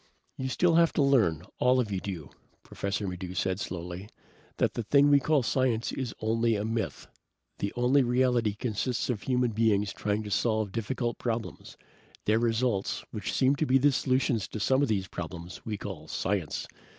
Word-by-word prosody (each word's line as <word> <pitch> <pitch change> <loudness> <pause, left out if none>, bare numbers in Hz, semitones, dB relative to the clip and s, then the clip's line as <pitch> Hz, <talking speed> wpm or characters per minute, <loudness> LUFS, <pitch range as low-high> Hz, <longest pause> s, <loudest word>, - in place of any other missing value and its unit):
"You 130 0 -3
still 170 +4 +3
have 170 -1 +4
to 145 - +2
learn, 115 - +3 0.2
all 125 +1 +4
of 110 -5 -1
you 95 - -1
do," 90 -7 -6 0.3
Professor 100 +1 -3
Maddox 90 0 -5
said 95 +1 0
slowly, 90 +3 -6 0.5
"that - - +1
the - - -2
thing 140 +6 +4
we 140 - +7
call 145 -1 +2
science 125 -2 +1
is 130 -4 -3
only 115 +1 +1
a 105 0 -2
myth. 115 0 -3 0.5
The 100 - -1
only 125 +3 +4
reality 125 -3 +2
consists 125 +3 -1
of 105 -4 -4
human 125 -2 +1
beings 105 -2 +2
trying 105 +1 -1
to 105 - -7
solve 110 0 +1
difficult 120 +2 -2
problems. 115 -2 -4 0.5
Their 110 +1 +3
results, 115 -3 0
which 105 - -4
seem 135 +1 +3
to 155 - 0
be 135 +1 +4
solutions 130 -4 +1
to 110 - -6
some 130 +6 +2
of 145 - +3
those 95 -4 0
problems, 85 0 -7
we 105 -2 -2
call 90 -7 -7
science. 95 -1 -2
115 Hz, 175 wpm, -29 LUFS, 100-130 Hz, 0.5 s, we